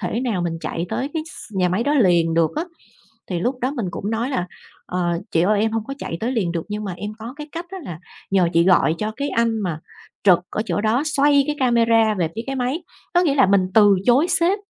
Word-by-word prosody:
thể 235 Hz, -, -2 dB
nào 225 Hz, -8 st, -1 dB
mình 165 Hz, -1 st, -2 dB
chạy 170 Hz, +2 st, -3 dB
tới 275 Hz, +9 st, -3 dB
cái 315 Hz, -, -1 dB
s -, -, -11 dB
nhà 180 Hz, -1 st, +2 dB
máy 190 Hz, +6 st, 0 dB
đó 290 Hz, +1 st, +1 dB
liền 175 Hz, -, +3 dB
được 165 Hz, -1 st, +3 dB
á. 320 Hz, -, 0 dB, 0.6 s
Thì 175 Hz, -3 st, -3 dB
lúc 250 Hz, +4 st, -2 dB
đó 255 Hz, -, 0 dB
mình 240 Hz, -9 st, -3 dB
cũng 205 Hz, +5 st, -4 dB
nói 235 Hz, +4 st, -1 dB
là 180 Hz, -9 st, -1 dB, 0.4 s
"Ờ, 175 Hz, -2 st, -1 dB
chị 165 Hz, -, +2 dB
ơi 205 Hz, +3 st, +2 dB
em 225 Hz, -, +1 dB
hông 225 Hz, -1 st, -1 dB
có 275 Hz, +4 st, -6 dB
chạy 165 Hz, -, -4 dB
tới 240 Hz, +4 st, -1 dB
liền 190 Hz, -8 st, 0 dB
được 165 Hz, -2 st, -2 dB
nhưng 210 Hz, +1 st, -4 dB
mà 195 Hz, -, -4 dB
em 210 Hz, +3 st, -6 dB
có 230 Hz, +4 st, -8 dB
cái 300 Hz, 0 st, -8 dB
cách 335 Hz, +1 st, -5 dB
á, 385 Hz, -, -6 dB
là 170 Hz, -6 st, -7 dB, 0.3 s
nhờ 190 Hz, -3 st, +3 dB
chị 170 Hz, +1 st, +4 dB
gọi 180 Hz, -3 st, +4 dB
cho 215 Hz, 0 st, -2 dB
cái 285 Hz, +1 st, -2 dB
anh 230 Hz, -1 st, +1 dB
mà 170 Hz, -5 st, -3 dB, 0.4 s
trực 185 Hz, -4 st, +6 dB
ở 215 Hz, -, -2 dB
chỗ 185 Hz, 0 st, -1 dB
đó 220 Hz, +5 st, +1 dB
xoay 285 Hz, -2 st, +3 dB
cái 300 Hz, -, -2 dB
camera 230 Hz, -3 st, +3 dB
về 165 Hz, -2 st, +1 dB
phía 225 Hz, -, -3 dB
cái 270 Hz, -, -3 dB
máy." 260 Hz, +7 st, -2 dB, 0.3 s
Có 350 Hz, -, +5 dB
nghĩa 315 Hz, -6 st, +2 dB
là 265 Hz, -7 st, +5 dB
mình 195 Hz, -1 st, +3 dB
từ 205 Hz, -3 st, +6 dB
chối 270 Hz, +8 st, +4 dB
sếp 360 Hz, +5 st, +2 dB
220 Hz, 255 wpm, -21 LUFS, 180-265 Hz, 0.6 s, trực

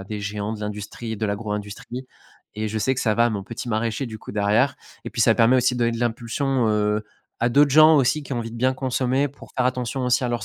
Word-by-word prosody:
à 95 Hz, -, -8 dB
des 105 Hz, +1 st, -5 dB
géants 105 Hz, +1 st, -3 dB
de 105 Hz, -, -9 dB
l'industrie, 105 Hz, +2 st, -5 dB
de 110 Hz, -, -1 dB
l'agro-industrie 105 Hz, +4 st, -5 dB, 0.5 s
et 110 Hz, -, -2 dB
je 110 Hz, +1 st, -2 dB
sais 130 Hz, +5 st, +1 dB
que 130 Hz, -, -3 dB
ça 110 Hz, -2 st, +1 dB
va 115 Hz, +2 st, +4 dB
à -, -, 0 dB
mon 100 Hz, -3 st, -4 dB
petit 115 Hz, +3 st, -7 dB
maraîcher, 115 Hz, +3 st, -1 dB
du 110 Hz, -1 st, -8 dB
coup, -, -, -10 dB
derrière. 105 Hz, +6 st, +2 dB, 0.3 s
Et -, -, -5 dB
puis, -, -, -4 dB
ça -, -, +5 dB
permet 115 Hz, +3 st, +5 dB
aussi 125 Hz, 0 st, +2 dB
de 125 Hz, -, -4 dB
donner 115 Hz, 0 st, +2 dB
de 115 Hz, -, -4 dB
l'impulsion, 120 Hz, +2 st, 0 dB
heu, 105 Hz, 0 st, +1 dB, 0.4 s
à 120 Hz, -, +3 dB
d'autres 140 Hz, +3 st, +5 dB
gens, 155 Hz, +2 st, +7 dB
aussi, 135 Hz, +3 st, +2 dB
qui 135 Hz, -, -7 dB
ont 120 Hz, -, -1 dB
envie 115 Hz, -1 st, -4 dB
de 115 Hz, -, -8 dB
bien 130 Hz, +2 st, +1 dB
consommer, 130 Hz, +1 st, 0 dB
pour 140 Hz, -, -15 dB
faire 130 Hz, -, +2 dB
attention 125 Hz, +1 st, -2 dB
aussi 125 Hz, +1 st, +2 dB
à 125 Hz, -, 0 dB
leur 120 Hz, -2 st, -1 dB
à -, -, -4 dB
115 Hz, 270 wpm, -23 LUFS, 105-130 Hz, 0.5 s, gens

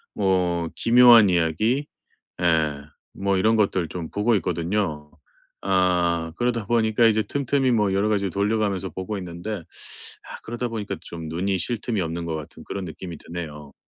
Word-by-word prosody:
뭐 90 Hz, -4 st, +1 dB
기묘한 120 Hz, -3 st, +7 dB
이야기 90 Hz, -, +1 dB, 0.6 s
예 80 Hz, -4 st, +1 dB, 0.3 s
뭐 100 Hz, 0 st, 0 dB
이런 110 Hz, +4 st, +3 dB
것들 95 Hz, -6 st, +1 dB
좀 85 Hz, -3 st, -5 dB
보고 105 Hz, +3 st, +1 dB
있거든요. 85 Hz, -4 st, -2 dB, 0.5 s
아 90 Hz, -3 st, +1 dB
그러다 120 Hz, -3 st, 0 dB
보니까 115 Hz, -1 st, +2 dB
이제 110 Hz, 0 st, +3 dB
틈틈이 135 Hz, +2 st, 0 dB
뭐 105 Hz, -4 st, +2 dB
여러 100 Hz, +2 st, +2 dB
가지를 100 Hz, -3 st, 0 dB
돌려 105 Hz, +4 st, +1 dB
가면서 100 Hz, -3 st, -1 dB
보고 95 Hz, +3 st, -5 dB
있는데 90 Hz, +4 st, -5 dB
아 85 Hz, -, -10 dB
그러다 120 Hz, +1 st, -4 dB
보니까 110 Hz, -3 st, -4 dB
좀 80 Hz, -3 st, -7 dB
눈이 95 Hz, +4 st, -1 dB
쉴 120 Hz, +5 st, 0 dB
틈이 110 Hz, -5 st, -1 dB
없는 85 Hz, +1 st, -3 dB
것 80 Hz, -1 st, -2 dB
같은 75 Hz, -1 st, -9 dB
그런 95 Hz, -2 st, -5 dB
느낌이 85 Hz, 0 st, -8 dB
드네요. 75 Hz, -4 st, -8 dB
95 Hz, 320 characters per minute, -24 LUFS, 85-110 Hz, 0.6 s, 기묘한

